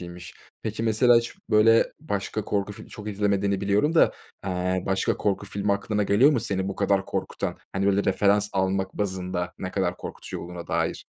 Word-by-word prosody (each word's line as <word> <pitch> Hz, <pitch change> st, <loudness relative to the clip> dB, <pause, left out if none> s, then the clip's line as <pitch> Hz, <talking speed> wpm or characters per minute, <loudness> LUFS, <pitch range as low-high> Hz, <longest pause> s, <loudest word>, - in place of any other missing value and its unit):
iyiymiş. 85 Hz, -1 st, -9 dB, 0.3 s
Peki, 110 Hz, 0 st, -3 dB
mesela 115 Hz, +2 st, +5 dB
hiç, 115 Hz, 0 st, 0 dB, 0.2 s
böyle, 115 Hz, +2 st, +5 dB
başka 105 Hz, -6 st, -3 dB
korku 100 Hz, -1 st, -1 dB
fil -, -, -12 dB
çok 105 Hz, 0 st, -8 dB
izlemediğini 100 Hz, -1 st, 0 dB
biliyorum 105 Hz, +11 st, +2 dB
da, -, -, +5 dB, 0.3 s
eee, 90 Hz, -1 st, -1 dB
başka 95 Hz, 0 st, +1 dB
korku 100 Hz, 0 st, -1 dB
filmi 100 Hz, +1 st, -1 dB
aklına 105 Hz, +1 st, 0 dB
geliyor 105 Hz, +8 st, +5 dB
mu 125 Hz, -, +1 dB
seni 100 Hz, -4 st, -2 dB
bu 100 Hz, -, -5 dB
kadar 100 Hz, -1 st, +2 dB
korkutan? -, -, -3 dB
Hani, 95 Hz, +1 st, 0 dB
böyle, 100 Hz, 0 st, +2 dB
referans 100 Hz, +1 st, +3 dB
almak 95 Hz, 0 st, 0 dB
bazında 90 Hz, -3 st, -3 dB
ne 95 Hz, -, -4 dB
kadar 90 Hz, -2 st, -1 dB
korkutucu -, -, -7 dB
olduğuna 85 Hz, 0 st, -8 dB
dair? -, -, -1 dB
100 Hz, 175 wpm, -25 LUFS, 95-105 Hz, 0.3 s, mesela